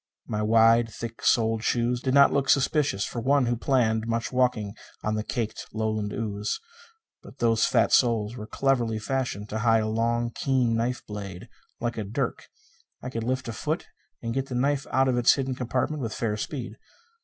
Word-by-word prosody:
My 105 - -2
wide, 115 +1 +5
thick 115 0 -7
soled 115 -1 +2
shoes 120 +1 +1
did 130 0 0
not 140 0 +7
look 140 -1 +1
suspicious 135 -7 +2
for 120 - -5
one 140 +2 +3
who 120 0 +1
planned 115 -3 +1
much 115 0 -1
walking 125 -5 +1 0.3
on 105 - 0
the 110 - -1
caked 110 -1 -4
Lowland 110 -1 -1
ooze. 105 0 -3 0.6
But - - -14
those 115 -1 +3
fat - - +2
soles 115 -2 +3
were 105 -3 -7
cleverly 120 -5 +1
fashioned 110 -2 -2
to 110 - -3
hide 115 0 +3
a - - -1
long, 115 +2 0
keen 125 -3 +1
knife 120 +2 -1
blade, 100 0 -7 0.3
like 120 -1 -2
a - - -2
dirk. 115 +8 -3 0.6
I 125 - -5
could 115 -3 -3
lift 130 +2 -2
a 115 - -4
foot 155 +8 -3 0.3
and 115 0 -2
get 135 +1 -2
the 125 - -5
knife 140 +2 0
out 135 0 +3
of 125 -1 +2
its 120 - +5
hidden 135 -1 -2
compartment 130 +4 -2
with 115 -3 -3
fair 110 -3 -1
speed. 125 +4 -5
115 Hz, 190 wpm, -26 LUFS, 110-130 Hz, 0.6 s, not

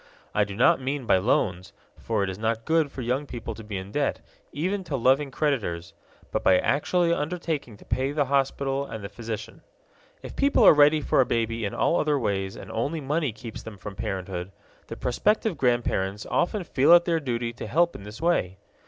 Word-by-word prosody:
I 105 - +3
do 100 -1 -7
not 125 +4 +4
mean 135 0 -3
by 95 - +4
loans 95 -3 0 0.3
for 110 -3 -1
it 95 - -1
is 95 - -9
not 115 +1 -1
good 160 -3 +2
for 135 - -6
young 130 +5 -1
people 120 - -6
to 110 - -10
be 105 -2 -5
in 95 +1 -7
debt, 145 +3 0 0.3
even 185 +6 -2
to 155 -4 -3
loving 135 +3 +3
creditors 110 - -2 0.4
but - - -1
by 95 - +5
actually 170 - +1
undertaking 155 - -3
to - - -17
pay 130 +2 -1
the 145 -1 +1
hospital 135 0 0
and 115 -6 -7
the 100 - -5
physician. 115 -3 -7 0.6
If - - -8
people 280 +1 +3
are - - +9
ready 150 +1 +5
for 135 - +3
a - - +3
baby 115 -1 -1
in 100 - -4
all 170 - +2
other 150 -1 +1
ways 95 -5 -2
and - - -9
only 140 +8 -2
money 150 0 -1
keeps 115 +1 -9
them 110 -2 -10
from 95 +1 -8
parenthood, 95 -1 -4 0.4
the - - -7
prospective 210 - +1
grandparents 120 -6 0
often 185 +3 0
feel 140 0 +4
it 175 0 +7
their 165 -2 +1
duty 120 -4 -3
to 120 - -7
help 170 +2 +2
in - - -8
this 105 +2 -10
way. 160 - 0
130 Hz, 205 wpm, -26 LUFS, 105-150 Hz, 0.6 s, are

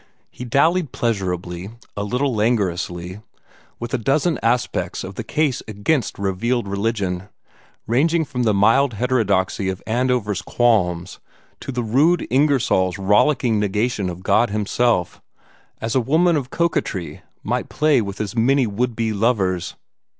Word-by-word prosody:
He 125 - -8
dallied 155 +5 +2
pleasurably, 90 -5 -2 0.3
a 100 - -2
little 125 +6 0
languorously, 95 -4 -1 0.6
with 120 0 -6
a 130 - +1
dozen 150 +7 +1
aspects 120 +2 -1
of 95 - -7
the - - -5
case 150 -5 0
against 110 +5 -1
revealed 100 +4 -1
religion, 100 -2 -2 0.6
ranging 160 +8 +2
from 125 -3 -4
the 115 -3 +3
mild 115 +5 +3
heterodoxy 105 -5 0
of 95 0 -5
Andover's 120 -3 0
qualms 95 -7 +1 0.4
to - - -6
the 125 -1 -2
rude 145 +10 +2
Ingersoll's 130 -9 +2
rollicking 110 +4 +2
negation 105 0 0
of 90 +1 -8
God 120 +4 +3
himself, 105 -2 0 0.6
as 115 0 -3
a 130 - +3
woman 165 +7 +3
of 135 -4 -2
coquetry 150 - -2 0.2
might - - -2
play 150 -4 +2
with 100 -2 -6
as 110 +1 -4
many 130 +3 +3
would 115 +3 -2
be 115 -1 -1
lovers. 100 -5 0
115 Hz, 135 wpm, -21 LUFS, 100-130 Hz, 0.6 s, the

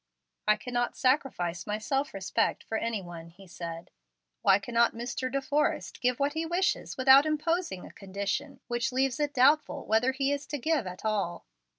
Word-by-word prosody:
"I 215 - +6
cannot 245 +2 -2
sacrifice 255 - 0
my 210 0 -1
self 270 +6 -1
respect 195 -1 0
for 225 - -5
any 220 -3 -2
one," 170 -1 -9
he 185 +4 -16
said. 170 -1 -7 0.5
"Why - - +5
cannot 235 +3 +1
Mr. 245 +2 -3
De 275 0 -1
Forrest 290 +1 -1
give 250 -1 +1
what 280 +1 +1
he 320 +1 -1
wishes 350 +4 -1
without 270 +3 +7
imposing 310 - -1
a - - -11
condition 200 +9 -4
which 240 -1 -1
leaves 260 0 0
it 295 -1 -1
doubtful 285 +4 +3
whether 225 +4 +3
he 270 +1 0
is 285 0 -3
to 295 - -3
give 290 - 0
at 180 +3 -8
all?" 195 -6 -1
245 Hz, 180 wpm, -29 LUFS, 200-280 Hz, 0.5 s, without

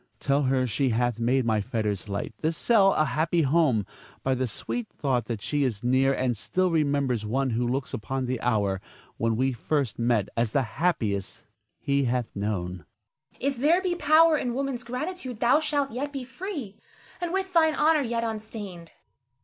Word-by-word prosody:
Tell 140 +1 +1
her 130 -1 +2
she 130 +3 0
hath 120 0 0
made 125 +2 +2
my 110 -2 +2
fetters 105 -3 -2
light, 100 0 -3
this 160 0 0
cell 200 -5 +4
a 155 - +3
happy 160 +3 +1
home, 135 - +3 0.4
by 135 - +2
the 130 0 -1
sweet 225 - -4
thought 130 -6 -1
that 115 -4 -4
she 145 -1 0
is 115 -5 -2
near 130 +2 +3
and 130 -2 0
still 185 - 0
remembers 140 -7 +1
one 130 +5 0
who 120 +2 0
looks 130 +2 -2
upon 130 +4 -3
the 125 -1 -2
hour 100 -5 +1 0.4
when 115 +4 +1
first 130 -1 -1
we - - 0
met 115 -5 +2
as 115 -2 0
the 140 - +3 0.2
happiest 110 - 0 0.4
he 140 -1 +1
hath 120 -1 -1
known. 95 -3 -2
Zara. 85 - -17 0.7
If 270 - -8
there 310 +8 +4
be 370 -2 0
power 315 -1 +5
in 240 -1 -2
woman's 270 -3 -2
gratitude, 255 0 -5
thou 250 +5 +4
shalt 290 -3 0
yet 275 +5 -3
be 275 -2 -5
free, 260 - -6 0.4
and 350 -1 -2
with 380 0 -2
thine 320 -2 +4
honor 310 0 +4
yet 235 -3 -1
unstained. 210 -6 -6
140 Hz, 180 wpm, -26 LUFS, -, 0.7 s, power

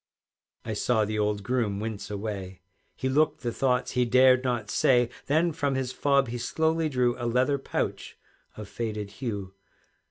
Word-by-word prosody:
I 110 - -3
saw 110 +1 +1
the 105 +1 -2
old 105 -1 0
groom 115 -4 -1
wince 110 -1 -5
away, 100 -3 -5 0.4
He 130 - -2
looked 150 +3 +2
the 120 - -2
thoughts 125 0 0
he 125 - +2
dared 130 +1 +5
not 120 -5 -2
say; 125 -2 +3 0.2
Then 160 +4 +2
from 145 -3 -1
his 130 -1 -2
fob 140 -1 +2
he 120 +1 -4
slowly 160 +5 0
drew 125 -3 +1
A 120 - -2
leather 130 +4 +2
pouch - - -3 0.4
of 105 -1 -7
faded 105 -2 -4
hue. 100 -6 -4
120 Hz, 165 wpm, -27 LUFS, 105-130 Hz, 0.4 s, dared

